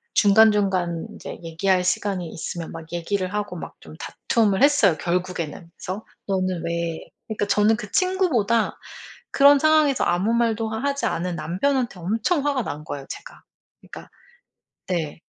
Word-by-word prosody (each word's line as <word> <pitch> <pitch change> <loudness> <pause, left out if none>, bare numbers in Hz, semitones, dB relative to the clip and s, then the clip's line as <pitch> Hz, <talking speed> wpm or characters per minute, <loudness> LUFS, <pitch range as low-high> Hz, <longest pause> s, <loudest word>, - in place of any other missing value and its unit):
중간중간 200 -5 +4
인제 - - -8
얘기할 180 +3 +1
시간이 185 -1 -1
있으면 165 +1 -5
막 165 0 -10
얘기를 185 +2 -2
하고 210 0 -3
막 - - -8
좀 - - -12
다툼을 220 -1 0
했어요 280 - +5
결국에는. 175 -2 -3
그래서 190 +4 -5 0.2
너는 185 -3 -1
왜 170 -1 -2 0.3
그러니까 215 -2 -2
저는 210 +2 +3
그 210 -1 -8
친구보다 285 - +1 0.5
그런 280 +1 +6
상황에서 310 -2 +3
아무 180 +6 +1
말도 225 -1 +1
하지 280 +6 -2
않은 175 +1 -1
남편한테 205 - -1
엄청 230 - 0
화가 280 -4 +1
난 150 - -5
거예요 140 -2 -6
제가. - - -9 0.4
그러니까 - - -11 0.8
네. 165 -5 -2
200 Hz, 325 characters per minute, -23 LUFS, 175-230 Hz, 0.8 s, 그런